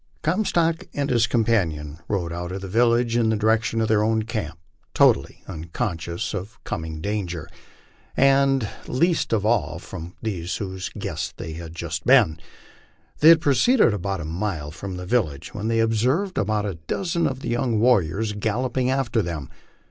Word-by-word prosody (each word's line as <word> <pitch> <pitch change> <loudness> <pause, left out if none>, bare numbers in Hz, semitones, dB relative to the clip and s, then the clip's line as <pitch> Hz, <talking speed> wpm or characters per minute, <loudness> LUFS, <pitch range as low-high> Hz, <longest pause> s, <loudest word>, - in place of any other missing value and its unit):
Comstock 170 -2 +1
and 140 -1 -1
his 115 -2 +3
companion 85 - 0
rode 85 -5 -2
out 85 +1 -4
of 95 +1 -5
the 95 - -6
village 115 +3 +2
in 115 -2 +3
the 110 - +2
direction 110 +1 +1
of 110 - +1
their 110 -1 +3
own 110 0 +1
camp, 105 -8 -4 0.4
totally - - +3
unconscious 85 0 -4
of 105 +2 -6
coming 80 -1 -5
danger, 90 -5 -3 0.7
and 135 -3 +4 0.2
least 165 +6 +1
of 105 -3 +1
all 105 -9 +1
from 90 0 -9
those 90 -6 -3
whose 95 -2 -4
guests - - -4
they 80 - -6
had 80 0 -8
just - - -4
been. 80 0 +5 0.8
The} 155 - +5
r - - +12
had 160 - 0
proceeded 145 - +4
about 95 -2 -2
a - - -5
mile 80 -3 -3
from 95 +4 -6
the 90 - -6
village 85 - -1
when 105 +1 -3
they 115 0 +1
observed 125 - +1
about 105 0 0
a 95 -5 -4
dozen 170 -3 0
of 130 0 -4
the - - -4
young 120 -2 0
warriors 105 -3 +2
galloping 125 +5 -1
after 130 -4 +1
them. 80 -7 -5
105 Hz, 170 wpm, -24 LUFS, 85-120 Hz, 0.8 s, r